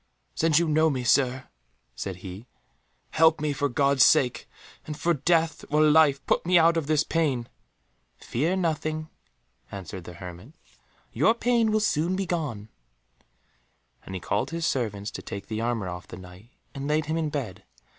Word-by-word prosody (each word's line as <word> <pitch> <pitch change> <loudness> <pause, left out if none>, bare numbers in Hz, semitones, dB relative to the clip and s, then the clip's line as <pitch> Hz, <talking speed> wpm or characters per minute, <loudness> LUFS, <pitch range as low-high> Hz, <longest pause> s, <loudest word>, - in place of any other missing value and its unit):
"Since 160 -2 +2
you 170 0 +3
know 155 +1 +3
me, 130 -4 -2
Sir," 130 +1 +2 0.5
said 95 -2 -5
he, 95 +6 -8 0.6
"help 160 0 +4
me 150 -1 -1
for 145 0 -1
God's 140 +1 +3
sake, 125 -2 +3 0.4
and 150 -1 -6
for 170 - +2
death 165 +1 +1
or 150 +1 +3
life 150 -3 +4
put - - +1
me 180 +1 +4
out 170 0 +5
of 165 -4 -1
this 155 -1 +2
pain." 140 -8 -1 0.7
"Fear 155 +10 -1
nothing," 155 -3 -2 0.6
answered 95 -2 -8
the 90 - -9
hermit, 90 - -10 0.6
"your 225 - +3
pain 235 -2 +2
will 215 - +2
soon 180 -4 0
be 195 0 -2
gone," 145 - -3 1.3
and 95 - -8
he - - -3
called 105 +3 -1
his 165 0 -3
servants 110 -5 -2
to - - -7
take 100 -3 -7
the 110 0 -4
armour 115 -4 -1
off 90 0 -7
the - - -9
Knight, 90 +4 -13 0.2
and 140 0 -5
laid 150 +1 +1
him 155 +2 -2
in 160 -2 -1
bed. 110 -10 -5
145 Hz, 170 wpm, -26 LUFS, 110-160 Hz, 1.3 s, out